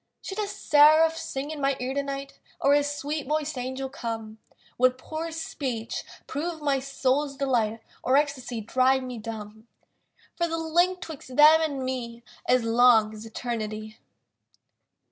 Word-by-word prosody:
Should 385 +2 -5
a 420 - 0
seraph 310 -1 +5
sing 285 -2 -4
in 305 -2 -6
my 275 -1 +1
ear 255 +1 -2
tonight, 275 0 -4 0.2
Or 280 - +4
a 290 - +5
sweet 290 0 -3
voiced 305 0 -1
angel 260 +1 -4
come. 225 -4 -6 0.4
Would 255 0 +4
poor 315 +5 -5
speech 260 -8 -4 0.2
prove 325 +3 -4
my 285 -2 +1
soul's 275 +1 -1
delight, 230 -5 0 0.2
Or 260 +2 +3
ecstasy 265 -5 -1
drive 255 +4 +2
me 250 -2 -6
dumb? 220 0 -8 0.7
For 340 - +1
the 330 0 -2
link 345 +3 +1
'twixt 280 -7 -8
them 310 +3 +8
and 285 -4 -1
me 240 -2 -4 0.3
Is 250 -1 +4
long 230 -2 +5
as 215 +1 -9
Eternity. 215 -2 -5
270 Hz, 145 wpm, -26 LUFS, 235-300 Hz, 0.7 s, them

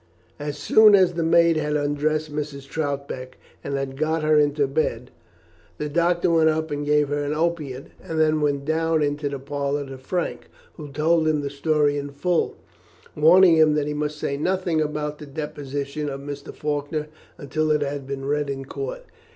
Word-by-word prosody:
As 145 0 -4
soon 215 +5 +6
as 185 -2 +4
the 170 - -2
maid 165 0 +4
had 150 -1 -1
undressed 150 +1 -1
Mrs. 145 -2 -5
Troutbeck, 140 -4 -4 0.3
and 140 - -3
had 135 -1 -3
got 155 +1 0
her 155 0 +4
into 145 -1 +2
bed, 135 -4 -2 0.7
the 150 - -3
doctor 170 +2 +2
went 160 -1 +4
up 160 0 -1
and 145 0 -2
gave 150 -1 +2
her 145 0 -1
an 145 +1 -2
opiate, 155 -5 -2
and 160 -1 -4
then 155 -1 +3
went 140 -1 0
down 160 0 +1
into 145 0 -1
the 140 - -4
parlour 140 +1 -3
to 135 -1 -9
Frank, 175 +7 -3 0.2
who 150 -2 -9
told 160 +2 +2
him 155 -1 +2
the 140 -1 -4
story 145 0 +1
in 140 0 -5
full, 165 +5 -1 0.6
warning 170 +2 +6
him 155 -1 +5
that 150 -1 +1
he 150 - -2
must 150 0 -3
say 140 -2 -2
nothing 175 0 0
about 150 0 -3
the 150 - -9
deposition 145 0 -4
of 135 0 -5
Mr. 140 0 -7
Faulkner 150 +1 -3 0.3
until 155 +2 -2
it 150 -1 +2
had 140 -1 -4
been 135 -1 -5
read 145 0 0
in 135 -1 -4
court. - - -6
150 Hz, 185 wpm, -23 LUFS, 140-160 Hz, 0.7 s, soon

